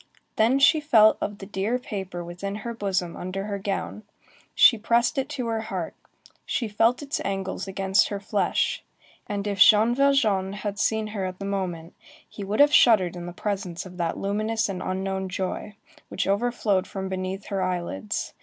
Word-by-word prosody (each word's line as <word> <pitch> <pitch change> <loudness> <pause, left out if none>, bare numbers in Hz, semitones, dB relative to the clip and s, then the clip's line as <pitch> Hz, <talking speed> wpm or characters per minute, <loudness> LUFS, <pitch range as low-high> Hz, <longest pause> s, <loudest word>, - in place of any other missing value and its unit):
Then 230 +5 +3
she 290 +3 +5
felt 220 -7 +5
of 205 0 -3
the 195 - -9
dear 205 +4 -1
paper 190 -7 -6
within 180 +4 -5
her 235 - -3
bosom 190 -5 -2
under 185 +2 -4
her 200 -1 -4
gown, 200 +1 -3 0.5
she 240 - +7
pressed 235 +5 +1
it 270 +2 -3
to 275 -5 -4
her 225 -1 -1
heart, 185 -6 -4 0.5
she 235 - -2
felt 225 +6 +2
its 285 0 -3
angles 195 0 -3
against 195 0 +2
her 200 - -4
flesh; 200 -2 0 0.4
and 205 -1 -3
if 200 -2 -3
Jean 220 +4 +7
Valjean 230 -8 +2
had 205 0 -5
seen 220 0 +1
her 195 -3 -2
at 185 0 -5
the 195 - -6
moment, 180 -4 -3 0.3
he 205 - -8
would 200 +2 -2
have 290 +1 +6
shuddered 190 -7 +5
in 175 0 -7
the - - -5
presence 190 -2 -4
of 180 -1 -11
that 170 -2 -1
luminous 215 +3 -1
and 185 -2 -4
unknown 190 0 -3
joy, 190 +3 -4 0.3
which - - -2
overflowed 205 -2 +1
from 190 -1 -5
beneath 190 +1 -4
her 195 -1 -1
eyelids. 175 - -3
200 Hz, 180 wpm, -25 LUFS, 190-220 Hz, 0.5 s, she